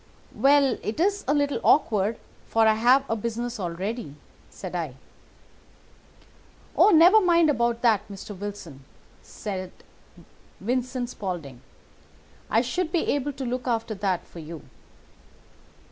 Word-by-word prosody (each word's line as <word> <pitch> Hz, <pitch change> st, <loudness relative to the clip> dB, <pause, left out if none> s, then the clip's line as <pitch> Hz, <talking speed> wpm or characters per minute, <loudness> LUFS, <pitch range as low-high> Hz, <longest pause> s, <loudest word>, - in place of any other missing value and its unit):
"'Well, 275 Hz, +2 st, +3 dB
it 215 Hz, +7 st, -4 dB
is 400 Hz, +3 st, +1 dB
a 285 Hz, -, +3 dB
little 285 Hz, -1 st, 0 dB
awkward, 215 Hz, -6 st, +3 dB, 0.3 s
for 225 Hz, 0 st, +3 dB
I 220 Hz, -, +5 dB
have 250 Hz, +5 st, +3 dB
a 225 Hz, -, -1 dB
business 235 Hz, +2 st, -4 dB
already,' 185 Hz, -, -4 dB, 0.3 s
said 185 Hz, -2 st, -8 dB
I. 160 Hz, -7 st, -3 dB, 1.8 s
"'Oh, -, -, +6 dB
never 365 Hz, +4 st, +7 dB
mind 340 Hz, -4 st, +4 dB
about 235 Hz, -3 st, 0 dB
that, 215 Hz, -3 st, +3 dB
Mr. 200 Hz, +1 st, -8 dB
Wilson!' 185 Hz, -8 st, -8 dB, 0.4 s
said 185 Hz, -3 st, -6 dB, 0.9 s
Vincent 250 Hz, +2 st, -2 dB
Spaulding. 165 Hz, -, -6 dB, 0.9 s
'I 225 Hz, -, +3 dB
should 320 Hz, +7 st, -2 dB
be 340 Hz, -, +1 dB
able 285 Hz, 0 st, -2 dB
to 265 Hz, 0 st, -6 dB
look 250 Hz, +1 st, -3 dB
after 230 Hz, -2 st, -1 dB
that 190 Hz, -3 st, -2 dB
for 170 Hz, -, -12 dB
you. 160 Hz, -1 st, -9 dB
230 Hz, 130 wpm, -25 LUFS, 195-275 Hz, 1.8 s, never